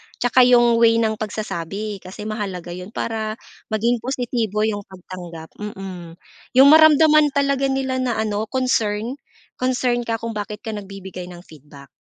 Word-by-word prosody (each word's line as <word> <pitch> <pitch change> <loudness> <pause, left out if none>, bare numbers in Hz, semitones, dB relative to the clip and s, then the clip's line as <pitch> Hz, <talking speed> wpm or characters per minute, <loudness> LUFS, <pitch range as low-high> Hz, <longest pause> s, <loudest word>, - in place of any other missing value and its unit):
tsaka 245 +1 +4
yung 240 -2 +5
way 230 -1 +5
ng 220 -1 0
pagsasabi 210 -1 -4
kasi 190 +3 -9
mahalaga 200 -5 -5
'yon 180 +1 -7
para 220 -1 -3 0.3
maging 230 +2 0
positibo 235 -4 -2
yung 210 -2 -1
pagtanggap, 175 -3 -10
mm. 190 -5 -7 0.4
Yung 265 +2 +8
maramdaman 310 -1 +6
talaga 275 -1 +1
nila 265 -1 -1
na 250 -2 -1
ano, 215 0 -1
concern, 235 -2 0 0.4
concern 250 -1 0
ka 230 - 0
kung 230 +1 -4
bakit 210 0 -5
ka 220 - -4
nagbibigay 195 -3 -8
ng 175 -1 -11
feedback. 145 -4 -15
215 Hz, 145 wpm, -21 LUFS, 195-245 Hz, 0.4 s, Yung